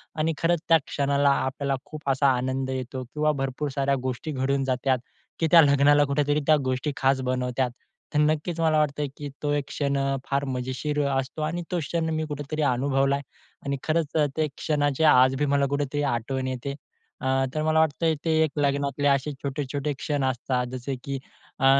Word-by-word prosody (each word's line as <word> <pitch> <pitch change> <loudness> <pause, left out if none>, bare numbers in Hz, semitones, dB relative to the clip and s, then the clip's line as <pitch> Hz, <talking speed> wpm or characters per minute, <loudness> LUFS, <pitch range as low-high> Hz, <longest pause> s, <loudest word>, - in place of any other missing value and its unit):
आणि 160 +1 0
खरंच! 170 0 +2
त्या 165 - +8
क्षणाला 140 0 +2 0.2
आपल्याला 135 +1 -1
खूप 155 -2 -6
असा 135 +1 +3
आनंद 130 +1 -2
येतो 130 0 -4
किंवा 150 +5 0
भरपूर 135 +2 -2
साऱ्या 140 0 +2
गोष्टी 130 +5 -3
घडून 135 0 0
जातात, 130 0 +1 0.4
की 165 - +2
त्या 170 -1 +9
लग्नाला 145 0 +5
कुठेतरी 145 +1 +1
त्या 155 -1 +6
गोष्टी 130 +3 -1
खास 135 0 +2
बनवतात. 125 0 -1 0.4
तर 150 - +2
नक्कीच 155 +3 +1
मला 160 -1 +3
वाटतं, 150 0 0
की 145 -1 -6
तो 145 - +1
एक 145 -1 0
क्षण 140 -1 -1
अ, 135 0 0
फार 140 0 0
मजेशीर 130 +4 -2
अ, - - +1
असतो 135 +4 -5
आणि 170 +3 -2
तो 180 - 0
क्षण 160 +2 -2
मी 155 0 -1
कुठेतरी 145 +1 -4
अनुभवला 135 +2 +1
आहे 140 - -4 0.4
आणि 140 0 -1
खरंच 160 -1 0 0.2
ते 155 - +2
क्षणाची 145 -1 0
आज 130 +1 +5
बी 145 - 0
मला 140 0 +3
कुठेतरी 145 0 -1
आठवण 130 +3 -2
येते. 130 +2 -3 0.5
अ, - - -2 0.3
तर 155 - 0
मला 155 0 +3
वाटते 160 +1 +2
ते 160 - +2
एक 155 - 0
लग्नातले, 140 0 +1
असे 140 +1 +2
छोटे-छोटे 140 +1 -2
क्षण 145 -1 -1
असतात, 125 0 -1
जसे 130 +1 -4
की 140 - -3 0.4
अ, 135 - +2
140 Hz, 185 wpm, -25 LUFS, 130-150 Hz, 0.5 s, त्या